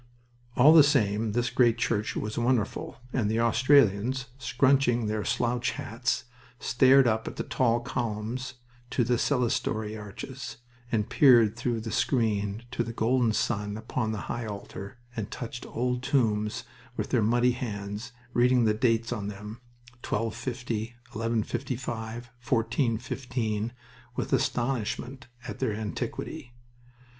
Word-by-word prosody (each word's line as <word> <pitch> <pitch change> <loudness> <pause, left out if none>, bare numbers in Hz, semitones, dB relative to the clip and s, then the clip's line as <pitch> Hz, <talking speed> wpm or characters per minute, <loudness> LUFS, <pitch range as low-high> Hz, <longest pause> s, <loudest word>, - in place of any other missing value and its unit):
All 145 +6 +8
the 165 - +10
same, 110 -7 +2
this 120 +1 0
great 120 -2 +4
church 105 -2 -1
was 105 0 -3
wonderful, 120 -2 0 0.2
and 115 -5 +1
the 110 +1 +1
Australians, 125 0 +3
scrunching 125 -1 +3
their 105 0 -1
slouch 120 +4 0
hats, 115 +3 -2 0.4
stared 130 +2 +5
up 110 -2 +1
at - - -5
the - - -3
tall 120 -2 +1
columns 120 +3 -3 0.3
to 125 - +1
the 120 +1 +2
clerestory 115 -5 0
arches, 115 +4 -7 0.3
and 105 -2 +1
peered 120 -6 +6
through 120 -1 -1
the 110 0 -5
screen 110 -4 0
to 120 - 0
the 115 0 -6
golden 120 +1 +2
sun 105 -1 -1
upon 110 0 -2
the 105 -3 -3
high 115 -1 -3
altar, 100 +1 -7 0.2
and 110 -4 -3
touched 120 0 -6
old 125 +1 -1
tombs 110 -6 +1 0.3
with - - -3
their 125 - +3
muddy 120 +3 +3
hands, 105 -2 -5 0.2
reading 125 0 +4
the 110 - +3
dates 115 +1 +1
on 105 -4 -4
them 105 +3 -8 0.4
1250, 115 0 -3 0.2
1155, 115 0 -3
1415 115 -2 -1 0.4
with - - -2
astonishment 125 +1 -1 0.2
at 105 - -6
their 130 -5 0
antiquity. 110 +3 -5
115 Hz, 130 wpm, -28 LUFS, 110-125 Hz, 0.4 s, the